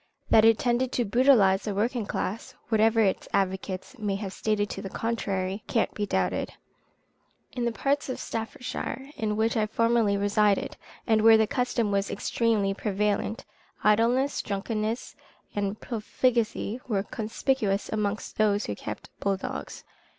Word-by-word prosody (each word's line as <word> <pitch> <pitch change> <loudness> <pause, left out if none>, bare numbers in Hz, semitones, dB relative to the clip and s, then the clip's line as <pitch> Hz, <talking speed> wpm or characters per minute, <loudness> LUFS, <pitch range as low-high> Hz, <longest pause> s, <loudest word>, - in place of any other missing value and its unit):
That 220 0 +7
it 225 -1 +6
tended 245 +1 +1
to 240 - +1
brutalize 210 -4 +4
the 205 -2 -3
working 230 +1 0
classes, 205 +5 -4
whatever 225 0 +4
its 195 -3 +1
advocates 190 +4 -2
may 205 -2 -1
have 195 -1 -5
stated 210 0 0
to - - -5
the 195 - -6
contrary, 200 -3 -2
cannot 225 - 0
be 205 -1 -2
doubted. 90 - -1 1.0
In 245 - -2
the 235 - +1
part 280 +4 0
of 255 - -3
Staffordshire 250 +4 -5
in 210 -1 -1
which 220 +2 +1
I 215 -2 +1
formerly 230 -2 +2
resided, 205 0 +2 0.3
and 220 -2 +3
where 225 0 +8
the 220 - +4
custom 235 -1 0
was 200 0 0
extremely 205 -1 0
prevalent, 205 +2 -1 0.4
idleness, 235 +6 +3
drunkenness 215 +3 -3 0.4
and 205 0 -2
profligacy, 235 0 -1
were 200 -5 0
conspicuous 220 -1 -1
amongst 210 0 -3
those 210 -1 +3
who - - -3
kept 105 +1 -7
bull 200 -1 0
dogs. - - -6
215 Hz, 145 wpm, -27 LUFS, 200-230 Hz, 1.0 s, where